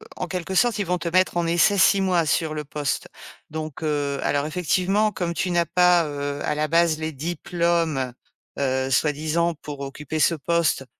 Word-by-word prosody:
en 180 - -4
quelque 185 +1 -4
sorte, 235 +1 +3
ils 200 - 0
vont 180 +1 0
te 170 0 -3
mettre 185 +1 +2
en 175 - +1
essai 170 +4 +3
6 195 +1 +5
mois 180 -3 +2
sur 155 +2 0
le 150 -1 -4
poste 145 -1 -3 0.4
donc, 155 -1 -6
heu, 145 -2 -1
alors 145 0 0
effectivement 185 +6 +1
comme 175 -3 -3
tu 180 +1 -1
n'as 170 -1 +2
pas, 180 0 +4
heu, 145 -1 -4
à 150 - 0
la 155 0 -1
base 165 -1 +3
les 160 0 -3
diplômes, 165 -3 -1 0.4
heu, 130 -1 0
soi-disant 155 +5 +1
pour 145 -2 -7
occuper 150 +3 -5
ce 165 +4 +4
poste, 160 -2 0
160 Hz, 185 wpm, -23 LUFS, 145-175 Hz, 0.4 s, 6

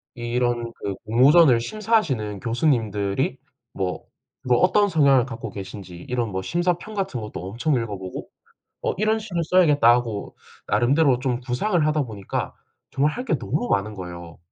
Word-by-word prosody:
이런 120 0 -1
그 100 -1 -4
공모전을 130 +4 +6
심사하시는 140 - -1
교수님들이 110 -5 0 0.4
뭐, 95 -2 -3 0.4
뭐 125 -1 +3
어떤 205 +2 +4
성향을 140 -6 +4
갖고 115 -3 -6
계신지 95 -2 -8
이런 120 -2 -1
뭐 95 0 -2
심사평 175 - -1
같은 195 - -2
것도 105 - -7
엄청 120 +8 -1
읽어보고, 100 -6 -4 0.6
어 - - 0
'이런 215 +2 +2
시를 190 -6 -3
써야겠다.' 155 -8 +4
하고 120 -4 -1 0.3
나름대로 135 +1 +3
좀 125 -1 -1
구상을 150 - 0
하다 155 0 +1
보니까 105 -5 -5 0.4
정말 145 +3 +1
할 250 - -5
게 - - +1
너무 245 - -2
많은 105 +2 0
거예요. 85 -3 -9
125 Hz, 330 characters per minute, -23 LUFS, 105-160 Hz, 0.6 s, 공모전을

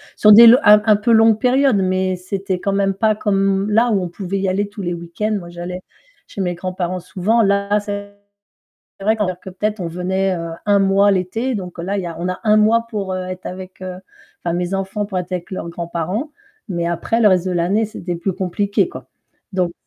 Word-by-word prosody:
sur 210 - +5
des 230 +3 +10 0.2
un 210 -1 +7
un 215 -1 +5
peu 215 +3 0
longue 225 -1 +5
période, 255 +2 +3
mais 185 -1 0
c'était 185 0 -4
quand 200 - -1
même 195 0 +1
pas 215 +2 +2
comme 195 -1 0
là 230 +3 +3
où 200 - +2
on 180 - -3
pouvait 190 +2 -4
y 195 - -1
aller 200 +2 -1
tous 205 0 -9
les 175 -1 -2
week-ends, 170 +6 -3
moi 175 -3 -8
j'allais 175 +1 -6 0.4
chez - - -11
mes 180 -2 -1
grands-parents 185 0 -4
souvent 195 +6 0
là 200 0 +1
c'est 205 -1 -6 0.9
vrai 220 +3 +1
que 185 -2 -3
peut-être 210 +3 -3
on 170 - -3
venait 185 +2 -1 0.3
un 205 -1 +4
mois 195 +1 +4
l'été 215 +7 -1
donc 180 -3 -7
là 190 +4 -2
il - - -2
y - - -4
a 170 - -5
on 180 - -2
a 185 - -3
un 215 -1 +4
mois 230 +2 +3
pour 200 -4 -3
être 185 0 -6
avec, 185 0 -8
heu, 185 -1 -6 0.5
enfin 170 - 0
mes 180 +1 -2
enfants 195 +2 -2
pour 190 -3 -3
être 180 +1 -6
avec 175 -1 -4
leurs 185 -3 -5
grands-parents, 170 - -4 0.4
mais 170 -2 -2
après 170 +7 -1
le 215 - +6
reste 185 -2 +2
de - - -1
l'année 180 +6 +1
c'était 180 -4 -5
plus 185 +3 -2
compliqué 195 +3 0
quoi. - - -11 0.4
Donc 180 -2 -1
195 Hz, 210 wpm, -19 LUFS, 180-210 Hz, 0.9 s, des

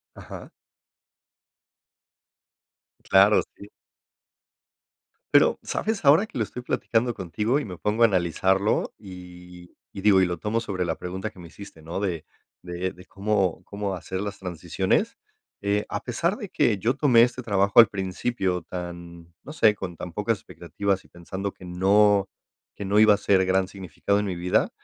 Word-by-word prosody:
Ajá. - - -10 2.6
Claro, 100 +2 +6
sí. 100 - -13 1.6
Pero, - - +5
¿sabes 220 -6 -3
ahora 150 +9 +6
que - - -10
lo 115 - +1
estoy 125 +4 -7
platicando 120 -1 0
contigo 105 - -1
y 150 - -5
me 90 -3 -8
pongo 105 +5 0
a - - +10
analizarlo?, 95 +1 +1
y 90 -2 -12 0.2
y 95 - -7
digo 95 -2 +5
y - - +4
lo 90 -1 -3
tomo 105 +6 -1
sobre 95 -6 -3
la 80 - -2
pregunta 95 +4 -5
que - - -17
me 85 - -10
hiciste, 90 -2 -13
¿no?, 85 +4 -5
de 90 -6 -3 0.4
de 90 +1 -4
de 90 -1 -15
cómo 100 -2 -1
cómo 100 -1 -4
hacer 95 +1 -5
las 100 -1 -5
transiciones, 90 -4 -1 0.4
eh, 100 +1 0
a 100 - -3
pesar 170 - -1
de 205 -7 -7
que 110 -4 +1
yo 115 +7 0
tomé 125 -5 +5
este 125 +1 -1
trabajo 100 -2 +3
al 115 - +10
principio 95 -1 -2
tan, 85 -1 -8
no - - -9
sé, 110 -8 +4
con 90 -4 -7
tan 90 0 -7
pocas 105 +3 -1
expectativas 95 +2 -3
y - - -21
pensando 95 +3 -6
que 90 - -14
no 100 +2 +3 0.5
que 100 - -6
no 100 +2 +2
iba 110 -1 +7
a - - -5
ser 100 -2 +2
gran 95 0 +1
significado 100 +1 -2
en 105 - -2
mi 95 -3 -3
vida, 90 +1 +1
100 Hz, 165 wpm, -25 LUFS, 90-105 Hz, 2.6 s, a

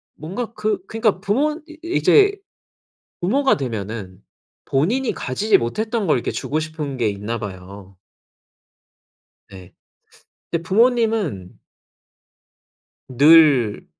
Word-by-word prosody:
뭔가 210 +9 -6
그 210 -3 -2
그러니까 220 -4 0
부모 290 - 0
이 315 0 -14
이제 400 +3 +4 0.9
부모가 265 +9 +2
되면은 105 -6 -6 0.4
본인이 225 - 0
가지지 205 - +1
못했던 220 - -2
걸 150 - +3
이렇게 - - -3
주고 155 +2 -3
싶은 155 -4 -5
게 115 -3 +1
있나 105 +3 -4
봐요. 95 -1 -10 1.5
네. - - -13 0.8
근데 170 -1 -2
부모님은 220 - 0 1.5
늘 140 -5 +5
160 Hz, 205 characters per minute, -20 LUFS, -, 1.5 s, 늘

